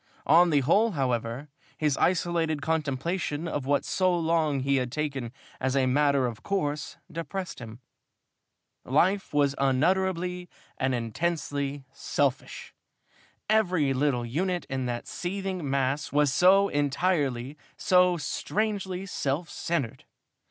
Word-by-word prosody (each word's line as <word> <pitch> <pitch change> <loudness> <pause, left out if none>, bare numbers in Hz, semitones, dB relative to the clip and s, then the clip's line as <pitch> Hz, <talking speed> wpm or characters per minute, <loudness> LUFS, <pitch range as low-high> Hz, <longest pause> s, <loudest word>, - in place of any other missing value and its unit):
On 170 +4 +6
the 145 -3 +3
whole, 205 - +3
however, 125 -1 -2 0.3
his 150 -3 +1
isolated 170 -3 +1
contemplation 160 +1 -1
of 145 -4 -3
what 145 0 +2
for - - -5
so 185 -2 +2
long 160 -4 +1
he 140 +1 +2
had 125 -2 -1
taken 135 -5 -3 0.3
as 130 0 -1
a 135 -1 +3
matter 140 0 +3
of 120 -2 -4
course 150 -3 -2
depressed 180 +3 -5
him. 115 0 -10 1.0
Life 185 +9 +1
was 145 -2 +2
unutterably 180 +6 +1 0.3
and 130 -1 0
intensely 140 +2 -2
selfish. - - -2 0.7
Every 180 -10 +2
little 130 -3 0
unit 175 +9 -1
in 130 -1 -2
that 120 -1 -3
seething 185 -4 -4
mass 135 +1 0
was 145 -1 +3
so 195 +4 +5
entirely, 145 -3 0 0.2
so 180 -1 +4
strangely 195 +1 -2
self 160 -2 -2
centered. 165 -9 -3
150 Hz, 125 wpm, -27 LUFS, 135-180 Hz, 1.0 s, On